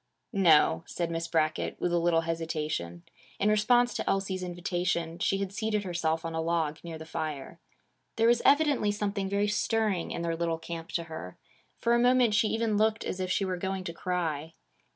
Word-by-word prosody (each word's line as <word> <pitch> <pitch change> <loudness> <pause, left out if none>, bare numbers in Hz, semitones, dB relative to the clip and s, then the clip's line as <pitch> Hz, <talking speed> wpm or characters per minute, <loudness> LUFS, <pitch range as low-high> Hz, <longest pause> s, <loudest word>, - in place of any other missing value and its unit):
'No,' 165 -4 +4
said 170 -1 -3
Miss 165 0 -2
Brackett, 155 -2 0
with 175 - 0
a 175 - +3
little 170 -1 +3
hesitation. 155 - -3 0.4
In 205 - +3
response 240 +3 +3
to - - -2
Elsie's 190 -1 -1
invitation, 175 -2 -2
she 195 - +1
had 195 -1 -3
seated 215 0 -1
herself 165 -3 -1
on 165 - -3
a 160 - -1
log, 160 -2 -1
near 165 -2 -6
the 160 - -9
fire. 155 -1 -5 0.6
There 225 0 +3
was 235 0 +4
evidently 285 -7 +4
something 200 -1 -2
very 200 +1 +1
stirring 210 -3 0
in 170 - -4
their 165 -1 -1
little 165 0 -1
camp 165 0 -7
to 170 - 0
her. 160 - -8 0.4
For 235 - +1
a 235 - +4
moment 245 -2 +4
she 215 +1 +3
even 225 -1 0
looked 220 +1 +2
as 185 - -4
if 185 0 -2
she 195 - +1
were 185 -1 -2
going 190 +1 -3
to 170 -2 -5
cry. 165 -4 -3
175 Hz, 195 wpm, -29 LUFS, 165-210 Hz, 0.6 s, No